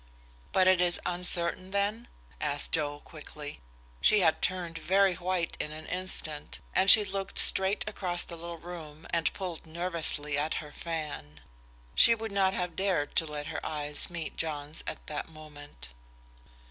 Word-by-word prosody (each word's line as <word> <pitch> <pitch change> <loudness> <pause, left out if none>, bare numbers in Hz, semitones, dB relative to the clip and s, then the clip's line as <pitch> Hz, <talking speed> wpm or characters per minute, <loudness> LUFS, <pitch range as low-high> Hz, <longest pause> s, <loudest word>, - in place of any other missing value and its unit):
"But 185 - +4
it 185 -1 +5
is 175 -1 +2
uncertain, 180 +1 0
then?" 200 +4 -1 0.3
asked 145 -1 +1
Joe, 145 -2 0
quickly. 150 - -9 0.4
She 210 - +5
had 160 -3 +3
turned 175 -2 -1
very 195 +1 +3
white 175 -1 -2
in 150 - -3
an 155 +1 -8
instant, 180 -5 0
and 190 +1 +3
she 210 0 +10
looked 195 0 -4
straight 190 +3 +4
across 180 -4 0
the 170 - -8
little 170 0 -7
room 160 -2 -10
and 170 -1 +1
pulled 180 -4 -6
nervously 160 -3 0
at 155 +2 -1
her 150 -2 -6
fan. 145 - -6 0.5
She 230 - +6
would 225 -1 -6
not 195 -1 +2
have 180 -2 -3
dared 190 -7 0
to 160 - +2
let 150 -1 -5
her - - -5
eyes 150 -1 +1
meet 170 -3 -5
John's 150 -1 -3
at - - -6
that 150 - -5
moment. 145 - -11
170 Hz, 160 wpm, -29 LUFS, 150-185 Hz, 0.5 s, she